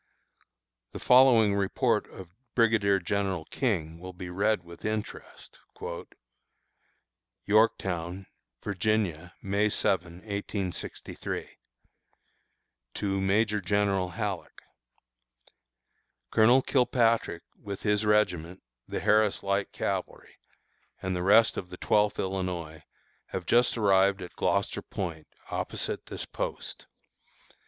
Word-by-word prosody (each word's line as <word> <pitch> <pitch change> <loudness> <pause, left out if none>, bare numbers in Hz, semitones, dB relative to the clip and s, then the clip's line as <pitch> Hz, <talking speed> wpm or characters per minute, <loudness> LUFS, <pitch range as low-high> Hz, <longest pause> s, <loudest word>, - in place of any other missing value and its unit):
The - - -6
following 125 -5 +6
report 100 -1 +1
of 90 -2 -11 0.2
Brigadier 110 -4 +4
General 95 -2 -2
King 85 - -1
will 90 +1 -8
be 90 0 -7
read 100 +1 +1
with 85 0 -13
interest: 110 0 -5 1.9
YORKTOWN, 95 -4 +1 0.4
Virginia, 95 -4 -1
May 100 +2 +1
7, 90 -4 0
1863. 100 0 -5 1.5
To 95 -1 -1
Major 105 +2 +2
General 100 -1 +1
Halleck: 100 0 -5 1.7
Colonel 120 +4 +5
Kilpatrick, 115 -8 +2 0.2
with 100 -1 -6
his 105 0 +2
regiment 95 -5 +1 0.2
(the - - -4
Harris 105 -1 +3
Light 100 0 0
Cavalry) - - -4 0.6
and 95 -1 -2
the 90 - -2
rest 110 +5 +5
of 90 - -5
the 90 - -9
Twelfth 105 +1 +2
Illinois, 90 -4 -3 0.5
have 95 -2 -5
just 120 +1 +3
arrived 100 -2 +3
at 90 - -10
Gloucester - - 0
Point, 85 -5 -5 0.2
opposite - - -3
this - - -5
post. - - -5
100 Hz, 100 wpm, -28 LUFS, 90-105 Hz, 1.9 s, following